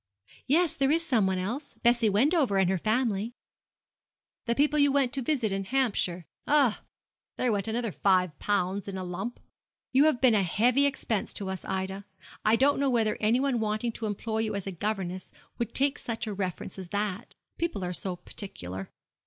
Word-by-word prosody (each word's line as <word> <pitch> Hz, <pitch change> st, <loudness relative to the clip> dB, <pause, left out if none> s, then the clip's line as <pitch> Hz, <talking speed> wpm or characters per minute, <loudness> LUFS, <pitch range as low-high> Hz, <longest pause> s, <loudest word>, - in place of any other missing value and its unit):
'Yes, 325 Hz, +4 st, +3 dB
there 275 Hz, -1 st, +2 dB
is 330 Hz, +3 st, +2 dB
some 230 Hz, -, +2 dB
one 190 Hz, 0 st, 0 dB
else. 230 Hz, +11 st, -4 dB
Bessie 235 Hz, -2 st, +3 dB
Wendover 260 Hz, -, +3 dB
and 190 Hz, -1 st, +3 dB
her 190 Hz, -, 0 dB
family.' 220 Hz, +1 st, 0 dB, 1.1 s
'The 235 Hz, -, +2 dB
people 295 Hz, +2 st, +3 dB
you 285 Hz, -1 st, +5 dB
went 270 Hz, -2 st, +2 dB
to 275 Hz, -, 0 dB
visit 245 Hz, -5 st, 0 dB
in 195 Hz, 0 st, -1 dB
Hampshire. 200 Hz, -8 st, 0 dB, 0.2 s
Ah! 280 Hz, -7 st, +3 dB, 0.6 s
there 250 Hz, -, +1 dB
went 205 Hz, 0 st, -1 dB
another 230 Hz, 0 st, -1 dB
five 185 Hz, -5 st, +2 dB
pounds 200 Hz, -1 st, 0 dB
in 195 Hz, -1 st, -4 dB
a 185 Hz, -, -4 dB
lump. 180 Hz, +7 st, -5 dB, 0.5 s
You 275 Hz, +3 st, +6 dB
have 310 Hz, -6 st, +3 dB
been 255 Hz, -2 st, +5 dB
a 210 Hz, -, +4 dB
heavy 245 Hz, +9 st, +3 dB
expense 235 Hz, -6 st, -2 dB
to 195 Hz, -2 st, -3 dB
us, 190 Hz, -, -5 dB
Ida. 190 Hz, +1 st, -3 dB, 0.4 s
I 215 Hz, +1 st, +4 dB
don't 275 Hz, +4 st, +3 dB
know 280 Hz, -1 st, +2 dB
whether 225 Hz, -4 st, +2 dB
anyone 245 Hz, +4 st, +2 dB
wanting 215 Hz, +2 st, -1 dB
to 225 Hz, -1 st, -5 dB
employ 220 Hz, +2 st, -3 dB
you 220 Hz, -2 st, -1 dB
as 200 Hz, -, -3 dB
a 195 Hz, -, -3 dB
governess 185 Hz, -1 st, -3 dB, 0.3 s
would 235 Hz, -, -3 dB
take 280 Hz, +1 st, +1 dB
such 230 Hz, 0 st, -4 dB
a 215 Hz, -, -3 dB
reference 190 Hz, -1 st, -4 dB
as 185 Hz, -, -7 dB
that. 205 Hz, +3 st, -3 dB, 0.2 s
People 335 Hz, -, -1 dB
are 180 Hz, -, -3 dB
so 185 Hz, +1 st, -4 dB
particular. 95 Hz, -, -5 dB
220 Hz, 185 wpm, -28 LUFS, 195-260 Hz, 1.1 s, You